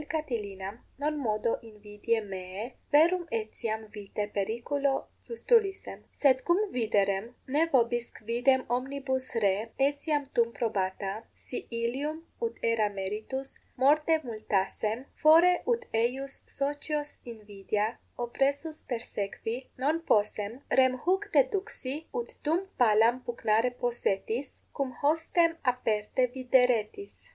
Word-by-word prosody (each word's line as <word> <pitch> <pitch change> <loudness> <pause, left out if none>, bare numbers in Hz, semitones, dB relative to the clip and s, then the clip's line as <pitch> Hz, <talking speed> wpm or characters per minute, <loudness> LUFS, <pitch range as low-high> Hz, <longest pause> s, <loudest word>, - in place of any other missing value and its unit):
Catilinam 210 -10 -3 0.2
non 300 +1 0
modo 230 -4 0 0.2
invidiae 210 +1 -2
meae, 185 +1 -5 0.3
verum 345 +4 +5
etiam 220 0 -4
vitae 205 0 -3
periculo 240 +7 0 0.3
sustulissem. 455 -4 +1 0.2
Sed 260 -2 +5
cum 345 - +6
viderem, 205 -3 +1 0.2
ne 285 +4 +2
4 - - -15
vobis 240 -1 +2
quidem 245 +4 +2
omnibus 265 0 -3
re 205 -4 +4 0.4
etiam 290 0 -1
tum 235 0 +3
probata, 200 -1 -2
si 250 - -7
illum, 290 +7 -2 0.2
ut 460 -1 -2
erat 215 -3 +2
meritus, 215 +8 -4 0.2
morte 300 +5 +4
multassem, 215 +1 -1 0.2
fore 330 +4 +8 0.2
ut 470 +1 -12
eius 255 +5 0 0.2
socios 290 +1 -1 0.2
invidia 210 -2 -2 0.3
oppressus 280 +6 -1
persequi 225 -1 -3 0.2
non 295 +6 +1
possem, 210 -2 0
rem 260 -1 +5
huc 385 +3 +1
deduxi, 285 - +1 0.2
ut 475 0 -3
tum 330 +6 +1
palam 230 +1 +5
pugnare 230 0 +1
possetis, 240 +2 -1 0.2
cum 270 -2 -2
hostem 330 +2 +3 0.2
aperte 225 +1 0
videretis. 250 - +2
250 Hz, 110 wpm, -29 LUFS, 215-290 Hz, 0.4 s, fore